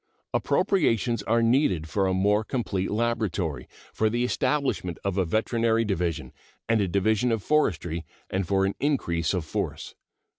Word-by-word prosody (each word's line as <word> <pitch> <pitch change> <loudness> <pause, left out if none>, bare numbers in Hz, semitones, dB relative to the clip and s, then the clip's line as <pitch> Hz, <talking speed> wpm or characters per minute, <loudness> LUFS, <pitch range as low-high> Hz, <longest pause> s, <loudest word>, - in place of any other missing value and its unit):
Appropriations 120 - +1
are 115 +3 +1
needed 115 - +2
for 95 +3 0
a 95 - +1
more 105 +3 +2
complete 105 -6 -2
laboratory, 105 -8 -1 0.3
for 110 - +1
the 120 +2 0
establishment 125 - 0
of 100 -2 -1
a 95 -2 +1
veterinary 115 +4 +1
division 90 -6 -2 0.3
and 115 -1 +3
a 100 - +1
division 105 +6 +1
of 110 -4 -1
forestry, 85 - 0 0.2
and 95 -1 -2
for 95 0 +2
an 95 - 0
increase 85 - 0
of 90 -5 -2
force. - - -4
105 Hz, 150 wpm, -26 LUFS, 90-115 Hz, 0.3 s, and